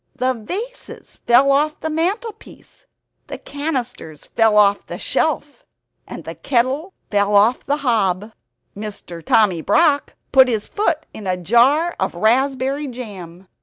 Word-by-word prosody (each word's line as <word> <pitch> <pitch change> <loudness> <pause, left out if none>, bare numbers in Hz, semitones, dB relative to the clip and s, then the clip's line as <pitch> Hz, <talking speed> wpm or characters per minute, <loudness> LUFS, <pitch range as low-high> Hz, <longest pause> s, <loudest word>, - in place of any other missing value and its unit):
The 255 +1 0
vases 390 - -8
fell 260 +4 +5
off 300 +2 +1
the 315 - -3
mantelpiece, 400 +8 -5 0.4
the - - -6
cannisters 255 - -5
fell 225 -2 +2
off 200 -1 +3
the - - -6
shelf; - - -2 0.5
the - - -7
kettle 270 +9 -1 0.2
fell 205 0 +2
off 215 +5 +4
the 285 +1 -1
hob. 210 -3 0 1.0
Tommy 195 -7 +3
Brock 290 - +2 0.2
put 265 -1 +6
his 220 -4 -1
foot 340 -7 -1
in 210 -3 -8
a 185 -1 0
jar 250 - +3
of - - -2
raspberry 265 +7 +1
jam. 195 -8 -9
250 Hz, 130 wpm, -19 LUFS, 210-295 Hz, 1.0 s, put